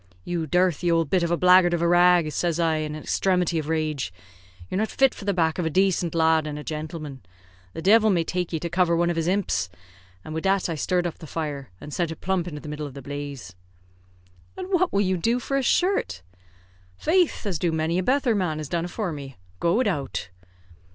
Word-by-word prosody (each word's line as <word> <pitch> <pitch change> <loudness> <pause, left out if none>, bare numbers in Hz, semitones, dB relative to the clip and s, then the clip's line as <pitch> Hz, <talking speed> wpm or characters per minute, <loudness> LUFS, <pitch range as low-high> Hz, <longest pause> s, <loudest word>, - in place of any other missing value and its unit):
'You 170 - -3
dirthy 180 0 +2
owld 165 -3 +1
bit 185 - +3
of 170 - 0
a 170 - +1
blackguard 180 -1 +5
of 170 - -3
a - - +3
rag,' 175 -2 +4
says 170 +1 -1
I, 165 -2 +2
in 155 -1 -3
an 155 - -8
exthremity 180 -3 +1
of 155 0 -5
rage, 155 - -1 0.6
'You're 185 - -2
not 220 - +1
fit 270 -1 +3
for 200 - -10
the 200 - +2
back 165 -2 +1
of 175 - 0
a - - 0
dacent 185 -1 +1
lad 160 -1 +3
an' 150 -1 -5
a 150 - -7
jintleman. 155 -3 -6 0.5
The 165 - -6
divil 220 +2 +5
may 175 -4 +2
take 180 +1 -3
ye 165 - -1
to 170 - -2
cover 170 0 +2
one 170 +1 +2
of - - -3
his 165 0 -1
imps;' 170 - 0 0.6
an' 155 - -6
wid 160 +2 -4
that 195 -1 +2
I - - -1
sthirred 175 +3 0
up 170 - -4
the 160 - -10
fire, 145 -4 -4
and 145 - -9
sent 175 -2 0
it 160 - -7
plump 185 -2 -1
into 150 -4 -6
the - - -10
middle 150 0 -4
of 140 - -12
the 140 - -8
blaze." 140 -8 -6 1.0
"And 375 0 -6
what 370 -1 +2
will 200 - +2
you 185 -2 +1
do 230 +8 +1
for 275 - -3
a 275 - +2
shirt?" 265 - +1 0.7
"Faith, 355 0 +2 0.2
do 175 - 0
as - - +1
many 160 +2 0
a - - +1
betther 260 +3 +2
man 180 -7 -1
has 155 -2 -6
done 170 -1 -1
afore 185 +1 -3
me, 140 -5 -8 0.2
go 170 +1 +2
widout." 180 - -1
170 Hz, 230 wpm, -25 LUFS, 155-185 Hz, 1.0 s, blackguard